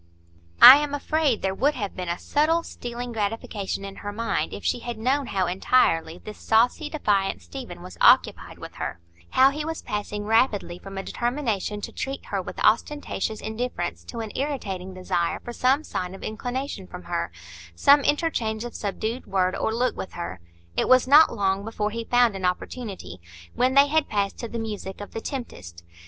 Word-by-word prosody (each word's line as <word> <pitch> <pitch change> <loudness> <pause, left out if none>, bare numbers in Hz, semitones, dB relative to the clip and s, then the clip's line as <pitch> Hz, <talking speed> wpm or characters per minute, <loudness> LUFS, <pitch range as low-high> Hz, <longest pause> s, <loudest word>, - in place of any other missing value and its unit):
I 270 - +13
am 295 -1 -1
afraid 290 -4 0
there 190 0 0
would 285 +9 +1
have 205 -5 -4
been 180 -2 -4
a 170 - -1
subtle, 320 +3 +1
stealing 245 -3 -6
gratification 205 -2 -3
in 195 0 -8
her 205 - -5
mind 230 +2 -2
if - - -8
she - - +1
had 240 -1 -6
known 260 +4 0
how 190 -2 0
entirely 175 -3 +2
this 210 +3 -10
saucy, 245 +7 +2
defiant 200 - 0
Stephen 85 - -9
was - - -11
occupied - - +4
with - - -9
her; - - -4 0.3
how 265 +1 +5
he 300 +2 -4
was 320 +1 -5
passing 210 0 -4
rapidly 215 -5 +1
from 195 0 -9
a 195 - -3
determination 235 -5 -2
to - - -6
treat 270 +1 -5
her - - -2
with - - -8
ostentatious 260 -8 0
indifference 220 -6 -4
to 235 - -6
an 220 -2 -6
irritating 195 -10 -3
desire 175 -2 -1
for 240 - -7
some 265 +5 +2
sign 180 -9 -4
of - - -12
inclination 245 -2 -4
from 180 0 -9
her,—some 85 - +1
interchange 245 -8 0
of 240 - -7
subdued 220 +4 -4
word 185 -1 +1
or - - -1
look 245 +3 0
with 190 - -7
her. 170 - -6 0.4
It - - 0
was 255 0 +5
not 300 +4 +7
long 195 -1 0
before 215 -1 -2
he 230 +1 -4
found 245 -3 +3
an 190 - -6
opportunity, 180 - -4 0.3
when 255 +2 +1
they 280 0 +8
had 305 +1 +1
passed 200 -1 -1
to 235 - -4
the 235 - -6
music 210 -4 -5
of 205 - -8
"The 225 - -5
Tempest." 85 - -7
220 Hz, 185 wpm, -25 LUFS, 190-255 Hz, 0.4 s, I